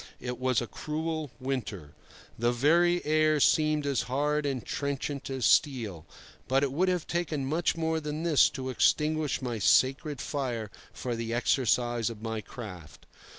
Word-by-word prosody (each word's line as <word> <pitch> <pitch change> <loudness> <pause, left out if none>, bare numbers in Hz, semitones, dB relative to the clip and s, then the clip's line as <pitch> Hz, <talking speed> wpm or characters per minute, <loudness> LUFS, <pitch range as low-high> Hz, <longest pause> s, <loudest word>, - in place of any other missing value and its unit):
It 125 -1 -5
was 130 -2 +1
a - - -2
cruel 155 +3 -4
winter. 110 - -4 0.4
The 120 +1 +1
very 170 +8 +3
air 155 0 +3
seemed 155 0 +3
as 140 -5 +1
hard 145 +2 0
and 130 -4 -3
trenchant 140 0 -3
as 130 -3 -2
steel; 110 - +2 0.4
but 135 +2 +2
it 140 - 0
would 180 +7 +1
have 180 -3 -1
taken 160 -5 -2
much 160 +4 0
more 160 0 0
than 150 +1 -4
this 165 -4 +5
to 130 0 -3
extinguish 150 +1 +1
my 120 -3 -3
sacred 135 - +3
fire 120 -8 -3 0.2
for 125 -2 -4
the 115 0 -3
exercise 120 -1 +1
of 115 -2 -8
my 110 -1 -3
craft. 95 - -10
135 Hz, 155 wpm, -29 LUFS, 120-155 Hz, 0.4 s, this